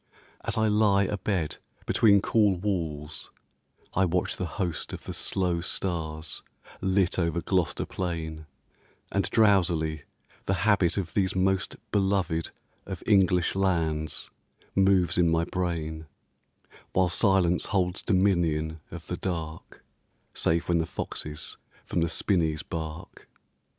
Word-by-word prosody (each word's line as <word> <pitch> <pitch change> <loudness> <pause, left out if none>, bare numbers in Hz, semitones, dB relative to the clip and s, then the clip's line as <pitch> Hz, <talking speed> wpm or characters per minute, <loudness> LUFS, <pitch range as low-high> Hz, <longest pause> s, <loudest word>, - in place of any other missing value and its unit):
As - - -2
I 110 0 +3
lie 105 -2 +4
Abed 95 -4 -1 0.3
between 100 -3 +4
cool 105 -4 +3
walls 85 -6 -3 0.6
I 95 - +3
watch 90 0 0
the 90 - -3
host 90 -6 -2
Of - - -7
the - - -6
slow 90 -3 -1
stars 80 -4 -3 0.4
lit 95 -1 +2
over 85 -1 +1
Gloucester 90 -1 0
plain, 80 -4 -4 0.6
And - - 0
drowsily 85 -8 +2 0.4
the 95 - +2
habit 100 -5 +3
of 90 -4 -2
these 95 -2 +1
most 95 0 +1 0.2
Beloved 95 -5 +1 0.4
of - - -6
English 90 -4 +4
lands 80 -5 0 0.4
moves 95 -3 +3
in 85 -1 +4
my 80 0 +2
brain, 80 -3 -3 0.9
While 95 -1 +3
silence 90 -2 +3
holds 90 -2 0
dominion 85 -5 +1
of - - -8
the - - -4
dark, 80 -3 -5 0.5
Save 85 +1 +1
when 85 -1 +2
the 80 - 0
foxes 75 +1 -5 0.3
from 85 - -1
the 85 - +1
spinneys 80 -6 +1
bark. 85 0 -7
90 Hz, 125 wpm, -27 LUFS, 80-95 Hz, 0.9 s, lie